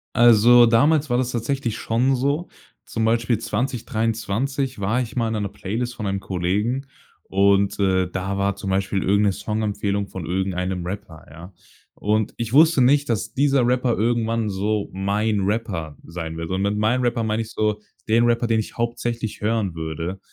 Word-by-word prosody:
Also, 120 Hz, +1 st, +7 dB
damals 145 Hz, +6 st, +3 dB
war 120 Hz, -, +2 dB
das 125 Hz, -1 st, 0 dB
tatsächlich 120 Hz, -1 st, -2 dB
schon 125 Hz, +5 st, +1 dB
so. 140 Hz, +7 st, -1 dB, 0.4 s
Zum 110 Hz, 0 st, -2 dB
Beispiel 115 Hz, 0 st, +2 dB
2023 125 Hz, +1 st, -2 dB
war 110 Hz, +6 st, 0 dB
ich 115 Hz, -4 st, -6 dB
mal 115 Hz, -2 st, +1 dB
in 110 Hz, -, -2 dB
'ner 105 Hz, -2 st, -2 dB
Playlist 120 Hz, +6 st, -4 dB
von 105 Hz, -3 st, -4 dB
einem 95 Hz, 0 st, -1 dB
Kollegen 105 Hz, +10 st, -1 dB, 0.4 s
und, 100 Hz, +1 st, +2 dB
äh, 95 Hz, -2 st, +2 dB
da 95 Hz, +1 st, -3 dB
war 100 Hz, 0 st, +1 dB
zum 100 Hz, -1 st, -4 dB
Beispiel 95 Hz, 0 st, 0 dB
irgend 100 Hz, +2 st, +3 dB
'ne 100 Hz, -, +3 dB
Songempfehlung 100 Hz, -1 st, -2 dB
von 95 Hz, -4 st, -7 dB
irgendeinem 90 Hz, 0 st, -2 dB
Rapper, 90 Hz, -4 st, -7 dB
ja. 90 Hz, +4 st, -12 dB, 0.4 s
Und 105 Hz, +1 st, 0 dB
ich 115 Hz, 0 st, -4 dB
wusste 155 Hz, -1 st, +6 dB
nicht, 140 Hz, +3 st, +4 dB
dass 110 Hz, -1 st, -2 dB
dieser 135 Hz, -3 st, +2 dB
Rapper 125 Hz, -1 st, +1 dB
irgendwann 115 Hz, -1 st, 0 dB
so 100 Hz, +2 st, -1 dB
mein 100 Hz, +2 st, 0 dB
Rapper 95 Hz, -7 st, -2 dB
sein 80 Hz, -1 st, -6 dB
wird. 80 Hz, -1 st, -5 dB
Und 95 Hz, +1 st, -1 dB
mit 100 Hz, +1 st, 0 dB
meinem 115 Hz, +4 st, +1 dB
Rapper 120 Hz, -1 st, 0 dB
meine 110 Hz, +1 st, 0 dB
ich 110 Hz, -, -11 dB
so 105 Hz, -1 st, 0 dB, 0.3 s
den 115 Hz, +2 st, +4 dB
Rapper, 120 Hz, 0 st, +2 dB
den 115 Hz, -1 st, +2 dB
ich 110 Hz, -, -6 dB
hauptsächlich 120 Hz, -1 st, -3 dB
hören 105 Hz, -4 st, 0 dB
würde. 80 Hz, +4 st, -4 dB
110 Hz, 175 wpm, -22 LUFS, 100-120 Hz, 0.4 s, Also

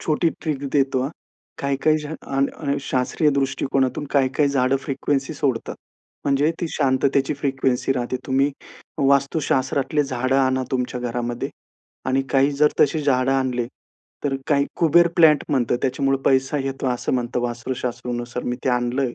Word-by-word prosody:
छोटी 160 Hz, +1 st, +1 dB
ट्रिक 145 Hz, -3 st, -3 dB
देतो 135 Hz, -2 st, +2 dB
हां. 135 Hz, -, -2 dB, 0.5 s
काही-काही 140 Hz, +3 st, +1 dB
जण 150 Hz, +1 st, -6 dB
अ, 135 Hz, 0 st, -2 dB, 0.3 s
अ, -, -, -2 dB
शास्त्रीय 130 Hz, +4 st, +1 dB
दृष्टिकोनातून 135 Hz, 0 st, 0 dB
काही-काही 140 Hz, +2 st, +3 dB
झाडं 135 Hz, -1 st, +2 dB
फ्रिक्वेन्सी 135 Hz, +1 st, -1 dB
सोडतात. 130 Hz, -5 st, -2 dB, 0.5 s
म्हणजे 145 Hz, +2 st, +2 dB
ती 175 Hz, -, 0 dB
शांततेची 135 Hz, 0 st, +1 dB
फ्रिक्वेन्सी 135 Hz, -2 st, 0 dB
राहते. 125 Hz, -1 st, -2 dB
तुम्ही 135 Hz, +2 st, +2 dB, 0.6 s
वास्तुशास्त्रातली 140 Hz, +1 st, +1 dB
झाडं 130 Hz, 0 st, 0 dB
आणा 130 Hz, -1 st, +2 dB
तुमच्या 125 Hz, -1 st, -2 dB
घरामध्ये 120 Hz, 0 st, -3 dB, 0.6 s
आणि 130 Hz, +1 st, +2 dB
काही 135 Hz, +1 st, +4 dB
जर 150 Hz, +2 st, +4 dB
तशी 155 Hz, +2 st, +3 dB
झाडं 130 Hz, -2 st, +2 dB
आणले. 130 Hz, -3 st, 0 dB, 0.6 s
तर 140 Hz, -2 st, 0 dB
काही 140 Hz, -1 st, +3 dB
कुबेर 170 Hz, +1 st, +5 dB
प्लांट 155 Hz, -4 st, +6 dB
म्हणतं 125 Hz, -4 st, +1 dB
त्याच्यामुळे 135 Hz, +1 st, +1 dB
पैसा 135 Hz, +2 st, +2 dB
येतो 135 Hz, 0 st, -3 dB
असं 125 Hz, -1 st, -1 dB
म्हणतं 125 Hz, 0 st, -1 dB
वास्तूशास्त्रनुसार. 120 Hz, 0 st, -4 dB
मी 125 Hz, -, -2 dB
ते -, -, +1 dB
आणलं 125 Hz, +2 st, 0 dB
आहे 125 Hz, -3 st, -2 dB
135 Hz, 145 wpm, -22 LUFS, 125-140 Hz, 0.6 s, प्लांट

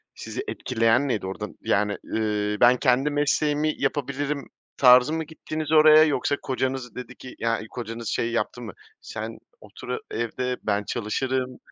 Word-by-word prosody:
sizi 390 Hz, -, -6 dB
etkileyen 125 Hz, -, +1 dB
neydi? 105 Hz, -7 st, -1 dB
Orada, 105 Hz, +2 st, -5 dB
yani, 105 Hz, 0 st, +1 dB
ııı, 105 Hz, -1 st, -1 dB
ben, 125 Hz, +1 st, +6 dB
kendi 130 Hz, +4 st, +2 dB
mesleğimi 150 Hz, +1 st, +1 dB
yapabilirim 140 Hz, 0 st, -2 dB, 0.3 s
tarzı 125 Hz, +2 st, +6 dB
mı 160 Hz, 0 st, -1 dB
gittiniz 155 Hz, 0 st, -6 dB
oraya 155 Hz, 0 st, +8 dB
yoksa 145 Hz, -2 st, +1 dB
kocanız 130 Hz, -1 st, -3 dB
dedi 125 Hz, 0 st, -8 dB
ki 130 Hz, -, -11 dB
ya, 115 Hz, 0 st, 0 dB
iii, 110 Hz, -, -8 dB
kocanız 115 Hz, 0 st, -6 dB
şey 115 Hz, 0 st, -1 dB
yaptı 120 Hz, +1 st, -2 dB
mı, -, -, -7 dB, 0.3 s
"Sen -, -, -7 dB, 0.2 s
otur -, -, -12 dB
a -, -, -2 dB
evde, 125 Hz, +2 st, -2 dB
ben 105 Hz, -1 st, 0 dB
çalışırım" 130 Hz, +4 st, -2 dB
125 Hz, 155 wpm, -25 LUFS, 115-145 Hz, 0.3 s, oraya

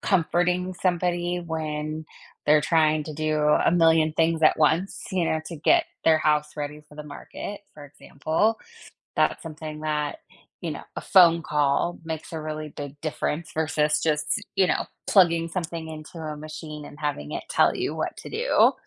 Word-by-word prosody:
comforting 180 Hz, 0 st, +1 dB
somebody 175 Hz, -1 st, 0 dB
when 155 Hz, -1 st, -3 dB, 0.4 s
they're 150 Hz, 0 st, +6 dB
trying 155 Hz, -1 st, +3 dB
to 155 Hz, -, -6 dB
do 155 Hz, 0 st, -1 dB
a 150 Hz, +2 st, +3 dB
million 160 Hz, -2 st, +4 dB
things 165 Hz, 0 st, +1 dB
at 155 Hz, -, +6 dB
once, 160 Hz, +5 st, +1 dB
you 185 Hz, -3 st, +1 dB
know, 160 Hz, -1 st, 0 dB
to 165 Hz, 0 st, -6 dB
get 335 Hz, -, +3 dB, 0.2 s
their 160 Hz, -1 st, +5 dB
house 150 Hz, -1 st, +1 dB
ready 150 Hz, +1 st, -5 dB
for -, -, -16 dB
the 150 Hz, -, -7 dB
market, 150 Hz, +7 st, -8 dB
for 150 Hz, -, -11 dB
example. 155 Hz, +9 st, -1 dB, 0.6 s
That's -, -, +2 dB
something 155 Hz, -1 st, -7 dB
that, 150 Hz, -, -2 dB, 0.4 s
you -, -, -3 dB
know, -, -, -7 dB
a -, -, -2 dB
phone 170 Hz, -4 st, +6 dB
call 150 Hz, +3 st, +1 dB
makes 160 Hz, 0 st, -6 dB
a 160 Hz, -, -4 dB
really 155 Hz, 0 st, -5 dB
big 145 Hz, 0 st, -8 dB
difference 155 Hz, +1 st, -3 dB
versus 150 Hz, -1 st, +1 dB
just, 155 Hz, -1 st, 0 dB
you 190 Hz, -1 st, +5 dB
know, -, -, 0 dB, 0.2 s
plugging 170 Hz, -4 st, +4 dB
something 165 Hz, -2 st, -4 dB
into 155 Hz, +1 st, -9 dB
a 155 Hz, -1 st, -5 dB
machine 155 Hz, 0 st, -8 dB
and 145 Hz, -, -12 dB
having 145 Hz, -, -3 dB
it -, -, -3 dB
tell -, -, +3 dB
you -, -, -2 dB
what -, -, -3 dB
to -, -, -9 dB
do, -, -, +4 dB
155 Hz, 170 wpm, -25 LUFS, 150-170 Hz, 0.6 s, they're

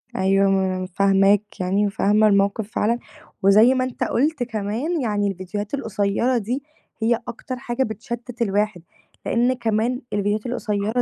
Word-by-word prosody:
أيوه، 195 Hz, +1 st, +3 dB
ما 190 Hz, -1 st, +1 dB
أنا 185 Hz, -, -3 dB
فاهماك 195 Hz, +2 st, +2 dB
يعني 195 Hz, +3 st, +1 dB
وفاهمة 210 Hz, +1 st, +3 dB
الموقف 200 Hz, +1 st, +1 dB
فعلًا، 235 Hz, +3 st, 0 dB, 0.4 s
وزي 215 Hz, +6 st, +6 dB
ما 255 Hz, 0 st, +1 dB
أنت 255 Hz, -1 st, -3 dB
قُلت 285 Hz, 0 st, +1 dB
كمان 235 Hz, +9 st, -2 dB
يعني 205 Hz, -3 st, 0 dB
الفيديوهات 200 Hz, +4 st, -5 dB
القصيّرة 225 Hz, 0 st, 0 dB
دي 245 Hz, +6 st, -3 dB, 0.4 s
هي 230 Hz, +1 st, +2 dB
أكتر 255 Hz, +2 st, -6 dB
حاجة 250 Hz, 0 st, -2 dB
بتشتِّت 235 Hz, +2 st, -6 dB
الواحد، 205 Hz, -4 st, 0 dB, 0.4 s
لأن 245 Hz, +2 st, +2 dB
كمان 235 Hz, +2 st, -1 dB
الفيديوهات 205 Hz, +2 st, 0 dB
القصيرة 220 Hz, -1 st, -1 dB
215 Hz, 140 wpm, -22 LUFS, 200-240 Hz, 0.4 s, وزي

